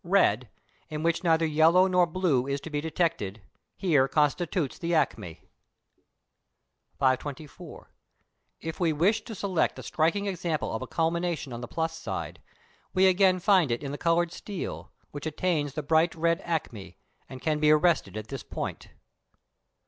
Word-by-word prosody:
Red, 130 Hz, -, +2 dB, 0.4 s
in 155 Hz, 0 st, -4 dB
which 165 Hz, +1 st, +1 dB
neither 165 Hz, -1 st, +3 dB
yellow 160 Hz, +4 st, +5 dB
nor 180 Hz, -2 st, +3 dB
blue 160 Hz, -7 st, +1 dB
is 140 Hz, 0 st, -1 dB
to 160 Hz, -, -8 dB
be 145 Hz, -1 st, -1 dB
detected, 155 Hz, -, -1 dB, 0.4 s
here 150 Hz, -9 st, +3 dB
constitutes 150 Hz, +2 st, 0 dB
the 170 Hz, 0 st, 0 dB
acme. 85 Hz, -, -1 dB, 1.5 s
524. 140 Hz, +3 st, -3 dB, 0.7 s
If 160 Hz, 0 st, -6 dB
we 165 Hz, -3 st, +2 dB
wish 185 Hz, +9 st, +2 dB
to 225 Hz, -, -8 dB
select 190 Hz, -3 st, 0 dB
a -, -, -8 dB
striking 165 Hz, +6 st, 0 dB
example 175 Hz, -5 st, -2 dB
of 110 Hz, -, -3 dB
a 130 Hz, -, -5 dB
culmination 165 Hz, -3 st, -1 dB
on 120 Hz, -, -6 dB
the 120 Hz, -, -6 dB
plus 160 Hz, 0 st, -2 dB
side, -, -, -5 dB, 0.5 s
we 185 Hz, +1 st, +5 dB
again 185 Hz, 0 st, +4 dB
find 180 Hz, -4 st, +4 dB
it 120 Hz, +4 st, -2 dB
in 140 Hz, -, -4 dB
the 145 Hz, -, -4 dB
coloured 170 Hz, 0 st, +2 dB
steel, 200 Hz, -1 st, -6 dB, 0.2 s
which 145 Hz, +1 st, -5 dB
attains 155 Hz, -3 st, -1 dB
the 155 Hz, -, -3 dB
bright 160 Hz, +3 st, +2 dB
red 170 Hz, +2 st, +1 dB
acme, 115 Hz, -, -4 dB, 0.3 s
and 130 Hz, -, -8 dB
can 155 Hz, -1 st, +1 dB
be 150 Hz, 0 st, +4 dB
arrested 155 Hz, -6 st, +3 dB
at 110 Hz, 0 st, -7 dB
this 135 Hz, -3 st, -5 dB
point. -, -, -6 dB
160 Hz, 155 wpm, -27 LUFS, 145-175 Hz, 1.5 s, yellow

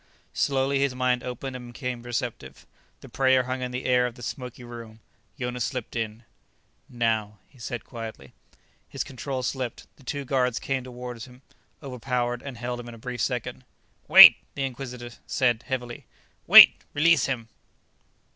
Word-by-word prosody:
Slowly, 135 Hz, 0 st, 0 dB
his 140 Hz, -2 st, 0 dB
mind 125 Hz, -1 st, 0 dB
opened 125 Hz, +1 st, -6 dB
and 125 Hz, -1 st, -9 dB
became 125 Hz, -1 st, -5 dB
receptive. 120 Hz, -, -5 dB, 0.4 s
The -, -, -12 dB
prayer 130 Hz, -1 st, +3 dB
hung 130 Hz, +1 st, -4 dB
in 125 Hz, -, -3 dB
the 125 Hz, +1 st, -5 dB
air 125 Hz, -1 st, +3 dB
of 120 Hz, -, -9 dB
the 120 Hz, -, -12 dB
smoky 125 Hz, 0 st, -7 dB
room. 115 Hz, -2 st, -10 dB, 0.4 s
Jonas 125 Hz, -1 st, -3 dB
slipped 125 Hz, -2 st, -5 dB
in 115 Hz, 0 st, -4 dB, 0.7 s
"Now," 110 Hz, -3 st, -1 dB
he 130 Hz, -, -23 dB
said 120 Hz, 0 st, -5 dB
quietly. 115 Hz, -3 st, -9 dB, 0.6 s
His -, -, -3 dB
control 130 Hz, 0 st, -5 dB
slipped. 125 Hz, -2 st, -4 dB
The 140 Hz, -, -19 dB
two 140 Hz, +2 st, -4 dB
guards 125 Hz, -2 st, 0 dB
came 135 Hz, -2 st, -2 dB
toward 125 Hz, -1 st, -8 dB
him, 125 Hz, +1 st, -17 dB, 0.4 s
overpowered 125 Hz, -2 st, -3 dB
and 135 Hz, -4 st, -8 dB
held 120 Hz, +1 st, -4 dB
him 120 Hz, -, -9 dB
in 115 Hz, -, -10 dB
a -, -, -13 dB
brief 120 Hz, +1 st, -6 dB
second 125 Hz, 0 st, -3 dB, 0.4 s
"Wait," -, -, +11 dB, 0.2 s
the 140 Hz, -, -2 dB
Inquisitor 125 Hz, -2 st, -6 dB, 0.2 s
said 120 Hz, -3 st, 0 dB
heavily. 120 Hz, -2 st, -5 dB, 0.4 s
"Wait. -, -, +10 dB
Release 155 Hz, -2 st, +4 dB
him." 120 Hz, -5 st, -4 dB
125 Hz, 160 wpm, -25 LUFS, 120-130 Hz, 0.7 s, Wait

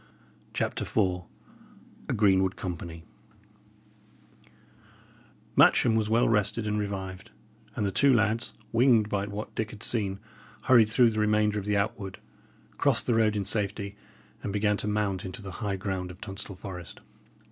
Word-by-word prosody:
CHAPTER -, -, -1 dB
IV 90 Hz, -4 st, 0 dB, 0.8 s
A -, -, +1 dB
GREENWOOD 95 Hz, -3 st, +3 dB
COMPANY 85 Hz, -2 st, -6 dB, 2.5 s
Matcham 115 Hz, -, +5 dB
was 110 Hz, -1 st, +1 dB
well 115 Hz, +2 st, +3 dB
rested 105 Hz, 0 st, +1 dB
and 105 Hz, 0 st, 0 dB
revived; 95 Hz, -2 st, -5 dB, 0.5 s
and 105 Hz, -, -1 dB
the 100 Hz, -, 0 dB
two 140 Hz, +8 st, +4 dB
lads, 115 Hz, 0 st, +1 dB, 0.2 s
winged 115 Hz, -3 st, +4 dB
by 100 Hz, -1 st, -1 dB
what 105 Hz, +1 st, -6 dB
Dick 110 Hz, -1 st, -2 dB
had 105 Hz, 0 st, -10 dB
seen, 100 Hz, -5 st, -1 dB, 0.5 s
hurried 120 Hz, -5 st, +6 dB
through 115 Hz, +1 st, +4 dB
the 110 Hz, -, -2 dB
remainder 105 Hz, 0 st, +2 dB
of 100 Hz, -, -7 dB
the 105 Hz, 0 st, +1 dB
outwood, 100 Hz, -1 st, -2 dB, 0.6 s
crossed -, -, +3 dB
the 120 Hz, -, +2 dB
road 110 Hz, -2 st, +3 dB
in 100 Hz, -2 st, -1 dB
safety, 100 Hz, -1 st, -2 dB, 0.5 s
and 100 Hz, -, -3 dB
began 105 Hz, +1 st, +1 dB
to 105 Hz, -, -3 dB
mount 105 Hz, -3 st, -1 dB
into 95 Hz, +2 st, -7 dB
the 95 Hz, -, -6 dB
high 100 Hz, -2 st, -1 dB
ground 95 Hz, -1 st, -3 dB
of 90 Hz, +1 st, -11 dB
Tunstall 100 Hz, -1 st, -7 dB
Forest. 90 Hz, -2 st, -8 dB
105 Hz, 150 wpm, -28 LUFS, 95-110 Hz, 2.5 s, hurried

